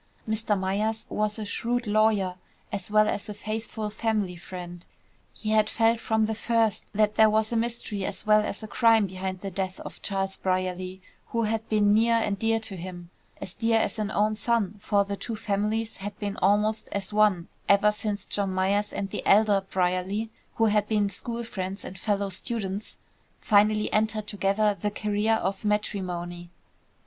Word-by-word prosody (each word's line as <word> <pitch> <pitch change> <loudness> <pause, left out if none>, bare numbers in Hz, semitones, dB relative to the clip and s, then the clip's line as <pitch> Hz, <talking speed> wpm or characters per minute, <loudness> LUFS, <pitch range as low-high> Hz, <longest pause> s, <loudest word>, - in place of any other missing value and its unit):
Mr. 220 -1 +1
Myers 210 +4 -1
was 210 0 -1
a 215 - -4
shrewd 240 +4 -1
lawyer, 210 -3 +2 0.4
as 200 -1 -4
well 215 0 +5
as 205 - -2
a 210 - -5
faithful 215 0 -4
family 210 -5 -1
friend. 175 0 -8 0.5
He 215 - -4
had 215 0 +4
felt 225 0 +2
from 220 -1 +1
the 220 +1 0
first 225 -1 +1
that 210 0 +2
there 220 0 +6
was 220 +1 +1
mystery 230 -3 -1
as - - -4
well 215 0 +6
as 210 +1 -4
crime 225 -1 +4
behind 185 0 -5
the 195 - -4
death 185 0 -3
of - - -9
Charles 195 -1 -2
Brierly, 185 0 -2 0.2
who 230 0 -1
had 225 +1 -1
been 205 -1 +4
near 230 +2 +4
and 210 -3 0
dear 225 +1 +2
to 220 -3 -5
him, 175 0 -8 0.3
as 190 - -6
dear 225 +1 +2
as 220 - 0
an 210 -1 -1
own 215 +1 +2
son, 215 -2 +1
for 200 -1 +2
the 200 0 -3
two 225 +3 -5
families 215 +1 -1
had 205 +1 -6
been 205 -1 -3
almost 210 +3 +2
as 200 0 -3
one 210 -5 +3 0.2
ever 200 +1 +6
since 210 -1 -3
John 200 -2 -1
Myers 195 +2 +1
and 195 -1 -4
the - - -3
elder 205 -1 +5
Brierly, 185 +4 0 0.2
who 225 - +3
had 210 -1 +2
been 210 -2 +2
school 235 +4 -4
friends 195 -3 -5
and 185 - -7
fellow 200 +1 -1
students, 200 0 -4 0.4
finally 210 0 +3
entered 215 0 +1
together 205 +1 +1
the 210 - +1
career 210 +1 +1
of 195 -2 -2
matrimony. 180 -4 -2
210 Hz, 175 wpm, -27 LUFS, 195-220 Hz, 0.5 s, there